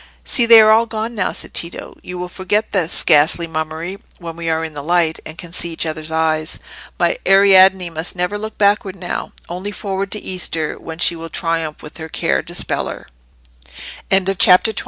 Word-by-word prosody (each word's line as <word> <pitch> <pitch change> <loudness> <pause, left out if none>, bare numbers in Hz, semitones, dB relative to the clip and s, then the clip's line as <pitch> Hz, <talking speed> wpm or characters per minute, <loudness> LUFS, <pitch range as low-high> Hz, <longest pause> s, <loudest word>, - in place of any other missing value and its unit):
"See, 240 -2 +3
they 230 -1 +10
are 215 0 +6
all 225 +1 +4
gone 220 +1 -4
now!" 195 -5 -1
said - - -8
Tito. 170 0 -4
"You 180 - -8
will 180 0 -4
forget 190 +4 -2
this 180 -5 +1
ghastly 155 +3 +4
mummery 160 +3 -5 0.2
when 165 -2 -8
we 165 -1 -4
are 160 0 0
in 160 - -8
the 145 - -6
light, 165 +1 +1
and 155 - -10
can 175 -1 -9
see 170 -1 0
each 165 - -1
other's 155 0 -5
eyes. 160 -1 0 0.4
My - - +1
Ariadne 190 -2 +5
must 160 +3 -4
never 180 +3 -2
look 220 +1 -7
backward 200 -2 +2
now—only 180 +1 -6
forward 195 -1 -4
to 210 - -3
Easter, 165 -5 -3
when 160 -1 -8
she 175 0 +2
will 165 0 -8
triumph 165 -2 -2
with 150 - -11
her 160 0 -7
Care - - 0
dispeller." - - -5 1.1
CHAPTER 190 +2 +4
XXI. - - -2
180 Hz, 185 wpm, -18 LUFS, 160-195 Hz, 1.1 s, they